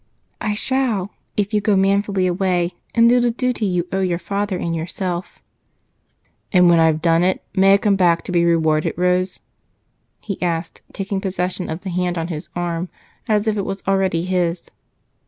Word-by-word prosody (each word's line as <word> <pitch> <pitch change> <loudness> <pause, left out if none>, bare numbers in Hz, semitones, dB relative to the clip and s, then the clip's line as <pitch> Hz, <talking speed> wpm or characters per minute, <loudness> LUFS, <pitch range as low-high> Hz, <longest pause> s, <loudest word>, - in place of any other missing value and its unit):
"I 210 -1 -1
shall, 225 -5 -1 0.3
if 205 +1 0
you 210 - +2
go 205 0 +2
manfully 195 0 +2
away 180 -1 0 0.2
and 230 0 +6
do 245 +1 +5
the 240 0 +2
duty 240 -2 -1
you 180 -1 -1
owe 190 - 0
your 180 -2 0
father 200 +2 -2
and 170 -1 -2
yourself." 175 +2 -4 1.1
"And 180 -2 +5
when 170 - +5
I've 160 -1 +3
done 165 -1 +4
it, 185 +1 +1
may 195 0 +5
I - - +4
come 200 -1 +1
back 175 -3 +3
to - - -6
be 170 -1 +3
rewarded, 160 -2 +2
Rose?" 180 +1 0 0.8
he 200 -3 -6
asked, 170 -1 -2
taking 195 0 -3
possession 185 -1 -3
of 160 +3 -4
the 190 - -5
hand 180 0 -1
on 165 +1 -3
his 155 -3 -6
arm 175 0 -2 0.4
as 210 -1 +2
if 215 -1 0
it - - +1
was 195 0 -5
already 190 -3 +1
his. 180 -2 -1
185 Hz, 180 wpm, -20 LUFS, 175-200 Hz, 1.1 s, and